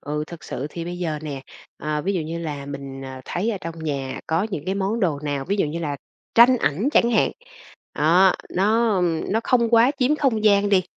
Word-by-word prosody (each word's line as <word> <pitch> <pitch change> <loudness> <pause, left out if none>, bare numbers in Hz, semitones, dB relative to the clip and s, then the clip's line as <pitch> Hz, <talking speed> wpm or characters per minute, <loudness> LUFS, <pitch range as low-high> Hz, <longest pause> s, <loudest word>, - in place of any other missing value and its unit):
Ừ, 150 +1 -3
thực 170 0 -11
sự 135 - -4
thì 170 +1 -6
bây 175 +1 -5
giờ 160 -4 -2
nè, 140 -3 -5 0.4
ờ, 150 0 -2
ví 195 +4 0
dụ 180 - -1
như 160 +2 -4
là 150 -4 -5
mình, 140 -1 -7
ờ, 130 -1 -8
thấy 200 +6 -1
ở 205 - -3
trong 165 0 -7
nhà 135 -3 -3
có 160 +3 +1
những 155 -7 -4
cái 190 - 0
món 200 +4 -1
đồ 165 -8 +1
nào, 145 -2 -2
ví 200 +6 -1
dụ 195 - +1
như 155 +3 -4
là 150 -4 -3 0.4
tranh 240 +2 +7
ảnh 190 - 0
chẳng 235 - +4
hạn, 225 - +3 0.6
đó, 180 +5 +5 0.2
nó, 215 +4 +2
ưm, 175 -1 0
nó 220 - +2
không 235 -3 +2
quá 235 +2 +6
chiếm 275 +3 +2
không 240 -8 +1
gian 205 -1 +4
đi, 195 -2 +4
175 Hz, 230 wpm, -23 LUFS, 150-210 Hz, 0.6 s, tranh